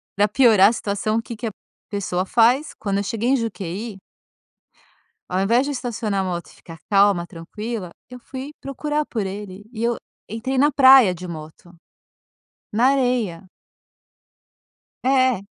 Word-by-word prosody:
para 205 Hz, +1 st, +3 dB
piorar 215 Hz, -3 st, +6 dB
a -, -, -1 dB
situação 215 Hz, 0 st, -1 dB
o -, -, 0 dB
que 230 Hz, +1 st, -8 dB
que 230 Hz, +1 st, -4 dB
a -, -, -3 dB, 0.4 s
pessoa 185 Hz, -3 st, -2 dB
faz? 245 Hz, +8 st, +3 dB
Quando 200 Hz, -1 st, -1 dB
eu 200 Hz, -, 0 dB
cheguei 225 Hz, +4 st, -2 dB
em 270 Hz, -, +4 dB
Juquehy 205 Hz, -2 st, -5 dB, 1.3 s
ao 185 Hz, +1 st, 0 dB
invés 230 Hz, +7 st, +3 dB
de 290 Hz, -, -3 dB
estacionar 230 Hz, -6 st, -2 dB
a -, -, -3 dB
moto 175 Hz, -2 st, -4 dB
e -, -, -18 dB
ficar 165 Hz, -2 st, -13 dB
calma, 200 Hz, -3 st, +4 dB
tranquila, 185 Hz, +3 st, -6 dB, 0.2 s
eu 250 Hz, -, -9 dB
fui 260 Hz, +3 st, -8 dB
procurar 295 Hz, +2 st, -2 dB
por 220 Hz, -5 st, -3 dB
ele. 195 Hz, 0 st, -7 dB
E 230 Hz, -1 st, -4 dB
eu 235 Hz, 0 st, +1 dB, 0.3 s
entrei 250 Hz, +5 st, -3 dB
na 290 Hz, +2 st, +4 dB
praia 260 Hz, -7 st, +7 dB
de 180 Hz, +1 st, -8 dB
moto, 160 Hz, +1 st, -10 dB, 1.0 s
na 235 Hz, +5 st, +3 dB
areia. 245 Hz, -10 st, 0 dB, 1.6 s
É. 260 Hz, -4 st, +3 dB
220 Hz, 155 wpm, -22 LUFS, 190-250 Hz, 1.6 s, praia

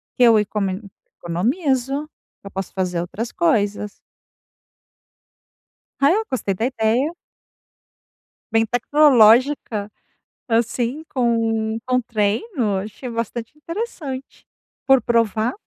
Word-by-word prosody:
que 250 Hz, -, +3 dB
eu 230 Hz, -2 st, +7 dB
econom 195 Hz, -2 st, -2 dB, 0.4 s
economizo. 265 Hz, -, -1 dB, 0.3 s
Que -, -, -11 dB
eu -, -, -9 dB
posso 190 Hz, -1 st, -5 dB
fazer 180 Hz, -2 st, -1 dB
outras 210 Hz, +7 st, -4 dB
coisas. 210 Hz, -, 0 dB, 2.1 s
Ah, 280 Hz, +2 st, +5 dB
eu 430 Hz, +5 st, +2 dB
gostei 250 Hz, -7 st, -1 dB
da 220 Hz, +5 st, -2 dB
ideia 245 Hz, +3 st, +1 dB, 1.4 s
bem 225 Hz, 0 st, +4 dB
tecnológica, 245 Hz, -3 st, +4 dB, 0.6 s
assim 235 Hz, +5 st, 0 dB
com 225 Hz, -3 st, +1 dB
com 255 Hz, 0 st, +2 dB
treino, 220 Hz, -, -1 dB
achei 215 Hz, +5 st, -8 dB
bastante 230 Hz, 0 st, -4 dB
interessante 300 Hz, -, -6 dB, 0.4 s
por 270 Hz, -2 st, +5 dB
provar. 230 Hz, 0 st, +1 dB
230 Hz, 100 wpm, -21 LUFS, 210-270 Hz, 2.1 s, eu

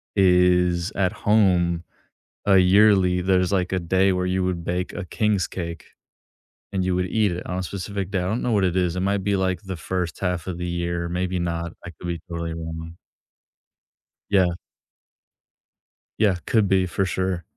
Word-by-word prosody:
is 90 Hz, -1 st, +3 dB
at 95 Hz, -2 st, +1 dB
home, 90 Hz, -5 st, +2 dB, 0.6 s
uh, 100 Hz, -, +6 dB
yearly, 95 Hz, -1 st, +5 dB
there's, 90 Hz, 0 st, +2 dB
like, 90 Hz, -1 st, 0 dB
a 95 Hz, -, +1 dB
day 95 Hz, +3 st, +2 dB
where 90 Hz, 0 st, 0 dB
you 90 Hz, 0 st, 0 dB
would 90 Hz, -2 st, -2 dB
bake 90 Hz, +1 st, -2 dB
a 90 Hz, -, -5 dB
king's 105 Hz, -1 st, 0 dB
cake, 85 Hz, -3 st, -6 dB, 0.9 s
and 95 Hz, -1 st, 0 dB
you 90 Hz, 0 st, 0 dB
would 90 Hz, 0 st, 0 dB
eat 105 Hz, +1 st, +1 dB
it 85 Hz, +1 st, -5 dB
on 90 Hz, 0 st, -3 dB
a -, -, -2 dB
specific 100 Hz, +1 st, -4 dB
day. 95 Hz, -, -1 dB
I 90 Hz, -, -2 dB
don't 110 Hz, +5 st, -1 dB
know 125 Hz, -, -1 dB
what 100 Hz, -3 st, +2 dB
it 90 Hz, -1 st, +1 dB
is, 90 Hz, -2 st, +1 dB
it 90 Hz, -, -1 dB
might 100 Hz, 0 st, 0 dB
be, 100 Hz, 0 st, +1 dB
like, 95 Hz, -1 st, 0 dB
the 95 Hz, -3 st, -6 dB
first 90 Hz, +1 st, -3 dB
1/2 90 Hz, -2 st, -2 dB
of 90 Hz, -2 st, -4 dB
the 90 Hz, -, -4 dB
year, 85 Hz, 0 st, -2 dB
maybe 90 Hz, +1 st, -2 dB
not, 85 Hz, -1 st, -3 dB
I 90 Hz, -, -7 dB
could 85 Hz, +2 st, -9 dB
be 85 Hz, -1 st, -3 dB
totally 85 Hz, -1 st, -4 dB
wrong. 80 Hz, 0 st, -7 dB, 1.3 s
Yeah. 95 Hz, -3 st, +4 dB, 1.7 s
Yeah. 105 Hz, -4 st, +3 dB
Could 110 Hz, -3 st, +2 dB
be 95 Hz, -1 st, +3 dB
for 95 Hz, +2 st, -1 dB
sure. 95 Hz, -1 st, -2 dB
90 Hz, 185 wpm, -23 LUFS, 85-95 Hz, 1.7 s, uh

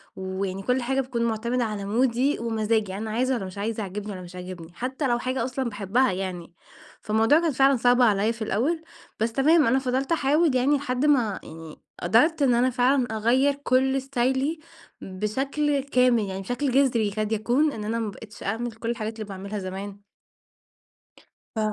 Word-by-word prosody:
ويعني 190 Hz, 0 st, -4 dB
كل 250 Hz, 0 st, +1 dB
حاجة 265 Hz, +2 st, 0 dB
بتكون 245 Hz, -2 st, -3 dB
معتمدة 235 Hz, +2 st, -1 dB
على 210 Hz, -3 st, -3 dB
مودي 250 Hz, +5 st, +1 dB
ومزاجي، 220 Hz, -3 st, 0 dB
يعني 200 Hz, +3 st, -5 dB
أنا 220 Hz, -, -4 dB
عايزة 255 Hz, +4 st, +1 dB
والّا 215 Hz, -7 st, -2 dB
مش 185 Hz, +1 st, -9 dB
عايزة، 215 Hz, +2 st, -2 dB
عاجبني 205 Hz, +2 st, -5 dB
والّا 185 Hz, -2 st, -7 dB
مش 175 Hz, +1 st, -12 dB
عاجبني، 180 Hz, -2 st, -8 dB
حتى 260 Hz, -, -3 dB
لو 240 Hz, -1 st, +1 dB
حاجة 255 Hz, -1 st, -2 dB
أصلًا 255 Hz, 0 st, -2 dB
باحبها، 210 Hz, +5 st, +1 dB
يعني. 180 Hz, -2 st, -5 dB, 0.5 s
فالموضوع 225 Hz, +8 st, +3 dB
كان 330 Hz, -2 st, +1 dB
فعلًا 270 Hz, 0 st, +4 dB
صعب 245 Hz, +1 st, +3 dB
عليَّ 215 Hz, -1 st, +3 dB
في 230 Hz, -, -14 dB
الأول، 265 Hz, -, 0 dB, 0.4 s
بس 225 Hz, +1 st, 0 dB
تمام، 300 Hz, +4 st, +4 dB
أنا 260 Hz, +3 st, +3 dB
فضلت 265 Hz, +2 st, -1 dB
أحاول 300 Hz, -1 st, +2 dB
يعني، 275 Hz, +3 st, +3 dB
لحد 265 Hz, 0 st, -1 dB
ما 240 Hz, -9 st, +2 dB
يعني 160 Hz, -1 st, -11 dB, 0.2 s
قدرت 285 Hz, -, +3 dB
إن 260 Hz, -3 st, +4 dB
أنا 245 Hz, +2 st, +3 dB
فعلًا 255 Hz, +1 st, +2 dB
أغيّر 245 Hz, +6 st, +2 dB
كل 265 Hz, -1 st, +1 dB
استايلي 265 Hz, +3 st, 0 dB, 0.4 s
بشكل 270 Hz, +10 st, -1 dB
كامل، 250 Hz, -4 st, +3 dB
يعني 190 Hz, 0 st, -4 dB
بشكل 245 Hz, +7 st, -2 dB
جذري، 250 Hz, -5 st, +3 dB
يكاد 215 Hz, +1 st, -3 dB
يكون 245 Hz, +8 st, +2 dB
إن 220 Hz, -5 st, -6 dB
أنا 225 Hz, +2 st, -2 dB
ما 220 Hz, -2 st, -2 dB
بقيتش 210 Hz, +1 st, -12 dB
أعمل 230 Hz, +4 st, -2 dB
كل 225 Hz, +1 st, -6 dB
الحاجات 225 Hz, -2 st, -3 dB
اللي 220 Hz, -1 st, -6 dB
باعملها 200 Hz, +2 st, -5 dB
زمان. 195 Hz, +2 st, -7 dB, 1.5 s
ف 220 Hz, -, -2 dB
235 Hz, 180 wpm, -25 LUFS, 210-265 Hz, 1.5 s, فعلًا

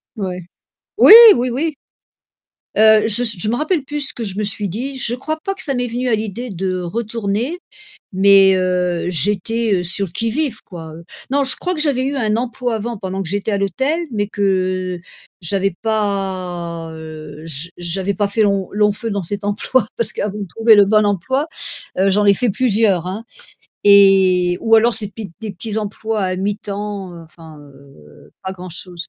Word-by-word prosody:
Ouais. 185 Hz, -3 st, -4 dB, 0.6 s
Oui, -, -, +9 dB, 0.2 s
oui, 245 Hz, +1 st, -1 dB
oui. 295 Hz, +5 st, -2 dB, 1.0 s
Heu, 220 Hz, 0 st, +6 dB
je 225 Hz, +3 st, 0 dB
s 225 Hz, -4 st, 0 dB
je 210 Hz, -, -2 dB
m'en 240 Hz, -, 0 dB
rappelle 310 Hz, -2 st, 0 dB
plus 295 Hz, +2 st, -4 dB
ce 290 Hz, +1 st, -1 dB
que 235 Hz, -, -6 dB
je 195 Hz, -2 st, -3 dB
me 215 Hz, -, -1 dB
suis 205 Hz, 0 st, -1 dB
dit, 260 Hz, +9 st, -5 dB
je 240 Hz, -1 st, -1 dB
crois 310 Hz, +5 st, -4 dB
pas 390 Hz, -, -2 dB
que -, -, -6 dB
ça 275 Hz, -, -1 dB
m'est 245 Hz, -1 st, -1 dB
venu 245 Hz, +2 st, -3 dB
à 225 Hz, -, +2 dB
l'idée 220 Hz, +3 st, -5 dB
de 185 Hz, -1 st, -3 dB
retourner, 225 Hz, -, -3 dB, 0.6 s
mais 195 Hz, 0 st, +6 dB
heu, 180 Hz, -2 st, 0 dB
j'étais 205 Hz, +3 st, 0 dB
sur 195 Hz, +3 st, +1 dB
le 175 Hz, -, -12 dB
qui-vive 230 Hz, -, -2 dB
quoi, 165 Hz, -4 st, -10 dB
heu, 165 Hz, +2 st, -11 dB, 0.3 s
non, 280 Hz, 0 st, +2 dB
je 265 Hz, -, -2 dB
crois 365 Hz, -, -3 dB
que 325 Hz, -, -5 dB
j'avais 275 Hz, -4 st, +1 dB
eu 275 Hz, +2 st, -2 dB
un 220 Hz, -4 st, 0 dB
emploi 245 Hz, 0 st, -2 dB
avant, 230 Hz, +2 st, -4 dB
pendant 190 Hz, +1 st, -4 dB
que -, -, -7 dB
j'étais 205 Hz, +3 st, -2 dB
à 200 Hz, -, +1 dB
l'hôtel, 265 Hz, -, -1 dB
mais 205 Hz, -2 st, -1 dB
que 185 Hz, -3 st, -1 dB, 0.4 s
j'avais 195 Hz, +2 st, 0 dB
pas, 185 Hz, -6 st, -3 dB
heu 155 Hz, -1 st, -10 dB
j' 160 Hz, +3 st, -3 dB
j'avais 185 Hz, +3 st, -2 dB
pas 205 Hz, +2 st, 0 dB
fait 215 Hz, +2 st, +1 dB
lon 200 Hz, -2 st, +1 dB
long 210 Hz, 0 st, +2 dB
feu 225 Hz, +3 st, -5 dB
dans 200 Hz, -2 st, -2 dB
cet 200 Hz, +4 st, -5 dB
emploi 210 Hz, +3 st, 0 dB
parce 230 Hz, -, +1 dB
qu'avant 205 Hz, 0 st, -3 dB
de 205 Hz, -, -4 dB
trouver 225 Hz, +5 st, +4 dB
le 205 Hz, -1 st, +6 dB
bon 215 Hz, +1 st, +3 dB
emploi, 260 Hz, -, -1 dB, 0.5 s
heu, 195 Hz, +1 st, +3 dB
j'en 205 Hz, +2 st, +2 dB
ai 200 Hz, -, +6 dB
fait 245 Hz, -1 st, 0 dB
plusieurs 205 Hz, -6 st, +1 dB
hein, 200 Hz, +5 st, -5 dB, 0.6 s
et 190 Hz, -3 st, +5 dB
ou 225 Hz, 0 st, +5 dB
alors 230 Hz, +1 st, +3 dB
ces 215 Hz, -3 st, -2 dB
petits 205 Hz, -2 st, -9 dB
des 215 Hz, -2 st, -5 dB
petits 215 Hz, +3 st, -6 dB
emplois 215 Hz, 0 st, -3 dB
à 185 Hz, -1 st, -1 dB
mi-temps, 200 Hz, -1 st, -4 dB
heu, -, -, -10 dB
enfin, 160 Hz, -1 st, -14 dB
heu, 135 Hz, -, -18 dB
pas 190 Hz, 0 st, -4 dB
grand-chose. 180 Hz, 0 st, -6 dB
205 Hz, 190 wpm, -18 LUFS, 185-230 Hz, 1.0 s, Oui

